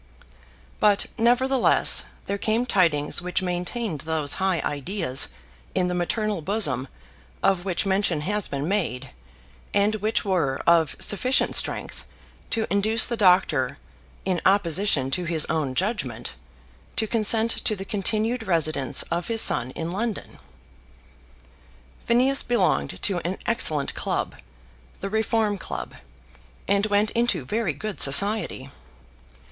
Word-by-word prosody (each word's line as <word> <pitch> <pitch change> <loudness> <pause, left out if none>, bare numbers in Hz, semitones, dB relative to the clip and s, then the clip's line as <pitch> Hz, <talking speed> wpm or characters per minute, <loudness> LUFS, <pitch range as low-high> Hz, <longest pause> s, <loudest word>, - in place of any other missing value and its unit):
But, 205 -1 +3
nevertheless, 245 +3 +2 0.2
there 200 0 -3
came 225 +4 0
tidings 165 -10 +1
which 180 +1 -2
maintained 180 - -3
those 155 -2 -1
high 190 -3 +1
ideas 145 -1 0 0.5
in 180 -1 +2
the - - -2
maternal 205 +2 -2
bosom 150 - -1 0.6
of 190 -2 +1
which 185 +1 -1
mention 190 -5 +1
has 205 +5 -1
been 140 +2 -4
made, 140 -10 -2 0.6
and 205 +1 +2
which 215 +1 -1
were 165 -9 0
of 165 -3 +3
sufficient 255 +6 +3
strength - - 0 0.5
to 225 -2 -1
induce 215 +3 +3
the 240 - -2
doctor, 180 - +2 0.5
in 185 -3 -1
opposition 180 -7 +2
to 180 +5 -1
his 160 -2 +2
own 140 -5 -2
judgment, 135 - -2 0.6
to 220 - 0
consent 225 +1 +1
to 215 - +1
the 195 -1 -7
continued 220 +4 -1
residence 155 -6 +1
of 170 0 -2
his 225 -1 +2
son 120 - +3
in 165 +1 -4
London. 215 +3 -4 1.7
Phineas 260 +4 +3
belonged 180 - 0
to 190 -3 +2
an 175 +3 -4
excellent 155 -11 +1
club, - - -3 0.7
the 195 - -5
Reform 220 -2 0
Club, 65 - -6 0.7
and 200 +1 +1
went 205 0 +1
into 230 - 0
very 210 - -1
good 205 +3 -6
society. 150 -3 +4
190 Hz, 125 wpm, -24 LUFS, 160-215 Hz, 1.7 s, society